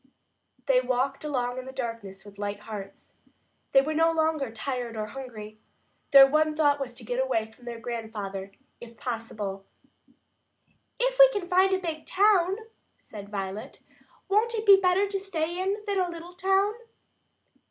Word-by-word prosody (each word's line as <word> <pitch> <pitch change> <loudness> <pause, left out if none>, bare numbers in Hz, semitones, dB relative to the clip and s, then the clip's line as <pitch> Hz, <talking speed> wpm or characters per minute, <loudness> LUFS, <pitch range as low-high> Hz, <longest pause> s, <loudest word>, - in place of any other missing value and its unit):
They 260 -2 +4
walked 260 +2 -1
along 255 -4 -2
in 255 - -8
the - - -6
darkness 230 -7 -6
with 200 -1 -14
light 205 0 -4
hearts. 205 -3 -9 0.5
They 270 - +6
were 310 +2 -2
no 325 +1 +3
longer 315 -4 0
tired 240 0 -4
or 215 - -2
hungry. 215 -3 -9 0.5
Their 275 -2 +10
one 305 +2 +2
thought 290 -2 +3
was 255 -3 -5
to 245 - -7
get 245 +3 -1
away 225 -4 -1
from 240 +2 -19
their 235 -1 -6
grandfather, 215 -4 -5 0.3
if 235 -1 -12
possible. 215 -5 -5 1.4
"If - - 0
we - - +10
can 410 -7 -4
find 375 +1 +4
a 380 - +3
big 325 -4 -5
town," 390 -2 +3 0.4
said 200 -2 -11
Violet, 195 0 -6 0.4
"won't 440 +4 +2
it 440 0 -3
be 395 -2 +8
better 370 +2 +3
to 395 0 -3
stay 350 -2 -3
in 400 +3 -2
than 400 -2 0
a 365 -1 +1
little 340 +1 -9
town?" 390 +3 +2
270 Hz, 165 wpm, -27 LUFS, 225-360 Hz, 1.4 s, Their